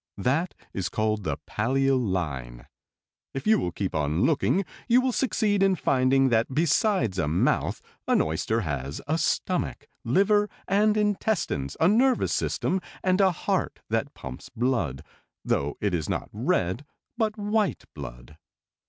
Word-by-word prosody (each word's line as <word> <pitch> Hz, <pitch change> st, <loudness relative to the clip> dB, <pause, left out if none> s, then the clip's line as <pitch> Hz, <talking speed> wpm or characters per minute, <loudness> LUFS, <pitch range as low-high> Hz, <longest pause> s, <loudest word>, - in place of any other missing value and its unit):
That 140 Hz, -, 0 dB, 0.2 s
is 95 Hz, -2 st, -2 dB
called 110 Hz, +1 st, -1 dB
the -, -, -1 dB
pallial 135 Hz, +4 st, +1 dB
line. 65 Hz, -, -3 dB, 0.7 s
"If 135 Hz, -, -4 dB
you 220 Hz, +1 st, +5 dB
will 90 Hz, -, -2 dB
keep 95 Hz, +2 st, -3 dB
on 75 Hz, +1 st, 0 dB
looking 165 Hz, +5 st, +2 dB, 0.2 s
you 245 Hz, 0 st, +5 dB
will 255 Hz, 0 st, +1 dB
succeed 215 Hz, -5 st, +1 dB
in 195 Hz, -1 st, +4 dB
finding 135 Hz, -3 st, +3 dB
that 115 Hz, +1 st, +2 dB
besides 150 Hz, -, +2 dB
a 80 Hz, -, +1 dB
mouth 80 Hz, +4 st, +1 dB, 0.2 s
an -, -, +4 dB
oyster 80 Hz, +9 st, 0 dB
has 70 Hz, -5 st, -4 dB
a 155 Hz, +3 st, 0 dB
stomach, 180 Hz, +3 st, -1 dB, 0.2 s
liver 205 Hz, -, +3 dB, 0.2 s
and 210 Hz, +2 st, +3 dB
intestines, 205 Hz, -, 0 dB
a 165 Hz, -, +5 dB
nervous 245 Hz, +6 st, +3 dB
system, 190 Hz, -, 0 dB, 0.2 s
and 185 Hz, +1 st, +3 dB
a 190 Hz, -, +6 dB
heart 170 Hz, -, -2 dB
that -, -, -1 dB
pumps 65 Hz, -1 st, -9 dB
blood, 115 Hz, -, -1 dB, 0.4 s
though 70 Hz, +1 st, 0 dB
it 100 Hz, -3 st, 0 dB
is 80 Hz, -4 st, -1 dB
not -, -, -3 dB
red 90 Hz, +11 st, 0 dB, 0.3 s
but 220 Hz, -2 st, -1 dB
white 210 Hz, -1 st, 0 dB
blood. -, -, -10 dB
130 Hz, 145 wpm, -26 LUFS, -, 0.7 s, a